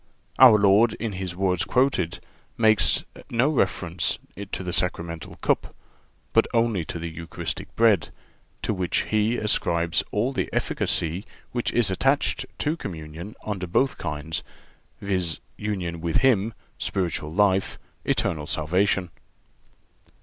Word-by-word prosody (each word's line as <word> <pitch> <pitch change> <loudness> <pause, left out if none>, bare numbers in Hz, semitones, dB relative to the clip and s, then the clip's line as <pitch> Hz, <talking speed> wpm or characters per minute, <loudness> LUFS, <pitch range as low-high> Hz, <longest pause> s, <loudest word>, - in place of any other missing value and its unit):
(378) 130 - +10
Our 105 -2 +5
Lord, 115 +4 +5
in 115 -2 -3
His 95 -2 -4
words 90 -2 +1
quoted, 125 -10 +1 0.4
makes 110 -2 +4 0.3
no 120 +5 +3
reference 90 - 0 0.3
to - - -3
the 90 -1 -3
sacramental 85 -3 -2
cup, - - 0 0.6
but - - +4
only 115 -6 +2
to 85 - -5
the 85 0 -4
Eucharistic 80 0 -6
bread, 110 -7 +4 0.5
to - - 0
which 90 -3 0
He 110 +2 +2
ascribes 85 -5 +1
all 120 +6 0
the - - -1
efficacy 85 +4 -1 0.3
which 120 -1 -1
is 115 -5 +2
attached 135 +9 +1
to 150 +2 0
communion 85 - -7
under 95 -4 -3
both 130 +10 +1
kinds, 75 0 -3 0.6
viz., 90 -5 -1 0.2
union 90 -4 -3
with 85 -1 -2
Him, 110 -3 +3 0.2
spiritual 85 -5 -2
life, 95 +1 +2 0.3
eternal 75 -2 0
salvation. 90 +4 +1
95 Hz, 130 wpm, -25 LUFS, 85-110 Hz, 0.6 s, 378